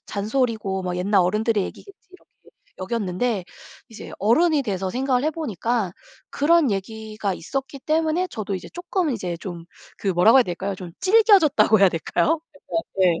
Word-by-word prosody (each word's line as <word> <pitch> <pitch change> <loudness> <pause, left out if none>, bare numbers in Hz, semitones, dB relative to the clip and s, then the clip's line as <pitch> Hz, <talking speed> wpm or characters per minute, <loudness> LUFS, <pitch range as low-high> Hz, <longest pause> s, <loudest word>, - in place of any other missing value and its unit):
잔소리고 215 -3 -1
뭐 180 -1 -3
옛날 195 +2 +2
어른들의 210 +3 +1
얘기겠지.' 395 0 -12
이렇게 370 - -18 0.5
여겼는데 195 +1 -2 0.4
이제 225 - -10
어른이 300 - +3
돼서 190 -5 -3
생각을 260 +3 0
해보니까 235 - -2 0.4
그런 305 -3 +3
얘기가 215 +1 -4
있었기 270 - -5
때문에 320 +4 0
저도 210 -7 -4
이제 185 - -6
조금 350 -1 -2
이제 185 -8 -3
좀 175 -2 -7 0.3
그 200 - -3
뭐라고 190 +7 +5
해야 260 - +7
될까요 190 +1 -4
좀 180 -2 -9
질겨졌다고 370 - +5
해야 195 - +7
될까요. 295 - 0
그래서 305 +3 -4 0.2
예. 175 -3 +3
220 Hz, 365 characters per minute, -23 LUFS, 190-290 Hz, 0.5 s, 해야